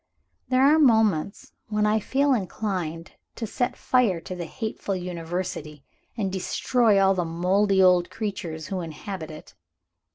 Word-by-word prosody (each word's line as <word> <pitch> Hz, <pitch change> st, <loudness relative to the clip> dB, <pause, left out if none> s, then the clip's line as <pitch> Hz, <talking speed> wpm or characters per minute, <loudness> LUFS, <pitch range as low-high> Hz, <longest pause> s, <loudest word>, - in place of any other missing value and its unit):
There 255 Hz, +1 st, +3 dB
are 300 Hz, +3 st, +6 dB
moments 220 Hz, -, +2 dB, 0.2 s
when 210 Hz, -1 st, 0 dB
I 215 Hz, +1 st, +3 dB
feel 275 Hz, +6 st, +1 dB
inclined 185 Hz, -6 st, -3 dB, 0.2 s
to 230 Hz, -, -4 dB
set 245 Hz, +3 st, -2 dB
fire 235 Hz, -9 st, +2 dB
to 185 Hz, -, -7 dB
the 175 Hz, -2 st, -5 dB
hateful 220 Hz, -3 st, -4 dB
University, 170 Hz, -4 st, -5 dB, 0.3 s
and 195 Hz, -4 st, -1 dB
destroy 210 Hz, +3 st, +2 dB
all 195 Hz, 0 st, +4 dB
the 180 Hz, -2 st, -1 dB
moldy 190 Hz, +4 st, +2 dB
old 180 Hz, -1 st, +4 dB
creatures 175 Hz, -7 st, -5 dB
who 190 Hz, -2 st, -2 dB
inhabit 165 Hz, +1 st, -6 dB
it. 155 Hz, -1 st, -11 dB
190 Hz, 140 wpm, -25 LUFS, 175-220 Hz, 0.3 s, are